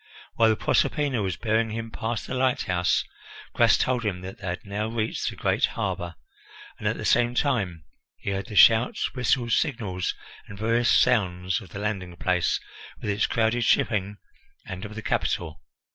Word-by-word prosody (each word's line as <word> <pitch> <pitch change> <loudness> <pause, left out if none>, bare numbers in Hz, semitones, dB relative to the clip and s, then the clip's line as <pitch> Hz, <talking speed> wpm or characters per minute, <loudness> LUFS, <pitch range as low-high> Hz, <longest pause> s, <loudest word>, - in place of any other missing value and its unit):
While 115 -1 +4
the 110 - +3
Proserpina 140 0 +1
was 95 -2 -2
bearing 110 0 +1
him 115 +1 -5
past 115 0 -3
the - - -5
lighthouse, 125 -9 +1 0.5
Gras - - +5
told 125 -2 0
him 95 -4 -2
that 95 +1 -8
they 95 - -6
had 90 +3 -4
now 105 +2 -2
reached 110 -1 -2
the - - -8
great - - +2
harbour, 85 -1 -3 0.6
and - - -2
at - - 0
the - - -5
same 120 0 +3
time 100 - 0 0.3
he 100 - -4
heard 100 +2 -3
the 110 - -8
shouts, 115 +4 +5
whistles, 125 -2 +1
signals, 105 - -2 0.3
and 100 - -10
varying 115 +3 +1
sounds 90 -7 +2
of 95 - -12
the 100 - -8
landing 100 -4 -3
place 90 0 +1 0.4
with 105 - -2
its 100 +2 +1
crowded 115 +1 +1
shipping, 105 -3 +1 0.5
and 95 +2 -6
of 105 +1 -8
the 110 - -6
capital. 80 -10 -1
105 Hz, 175 wpm, -26 LUFS, 95-115 Hz, 0.6 s, Gras